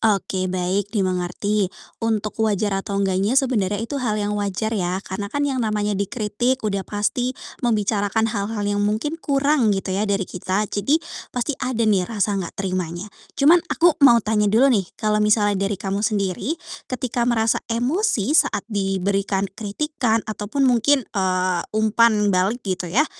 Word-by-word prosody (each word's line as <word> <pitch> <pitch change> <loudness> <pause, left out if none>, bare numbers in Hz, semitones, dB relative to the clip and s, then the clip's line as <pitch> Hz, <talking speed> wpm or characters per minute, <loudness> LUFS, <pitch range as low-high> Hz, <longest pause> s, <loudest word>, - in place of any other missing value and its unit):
Oke, 195 -3 +1
baik, 185 +2 -1
dimengerti. 185 +2 0 0.3
Untuk 220 -2 -1
wajar 210 -1 +1
atau 200 0 -4
enggaknya, 195 +4 +1
sebenarnya 215 -8 +2
itu 280 +4 -4
hal 220 -4 0
yang 205 0 -1
wajar, 205 +2 -2
ya, 180 -3 -1
karena, 200 +2 -5
kan, 285 +6 -1
yang 270 -3 -1
namanya 210 -2 0
dikritik 210 +5 -1
udah 200 -2 0
pasti 245 +5 -1 0.2
membicarakan 215 -2 +1
hal-hal 210 -1 -2
yang 205 0 0
mungkin 220 +11 -1
kurang, 280 -4 +2
gitu, 195 0 -3
ya, 205 +3 0
dari 200 -1 +1
kita. 185 +3 -2
Jadi, 210 +9 +2 0.3
pasti 250 +4 -2
ada, 250 -3 0
nih, 195 -4 +2
rasa 210 -2 0
enggak 190 -4 -4
terimanya. 185 0 -3 0.2
Cuman, 320 +5 +6
aku 345 +1 +4
mau 260 -4 +8
tanya 210 -1 +2
dulu, 250 +6 +4
nih, 195 -6 +1
kalau 215 -1 +1
misalnya 205 -2 +2
dari 205 - -2
kamu 195 +1 -3
sendiri, 210 - -1 0.3
ketika 245 -1 -1
merasa 225 -2 +2
emosi 245 - 0
saat 255 -9 +2
diberikan 195 0 0
kritikan 230 +2 -1
ataupun 215 +5 -2
mungkin, 255 +2 +3
eee, 185 -2 +1 0.2
umpan 215 -1 +3
balik, 195 +7 0
gitu, 185 -2 -2
ya, 245 - +3
210 Hz, 155 wpm, -22 LUFS, 195-235 Hz, 0.3 s, mau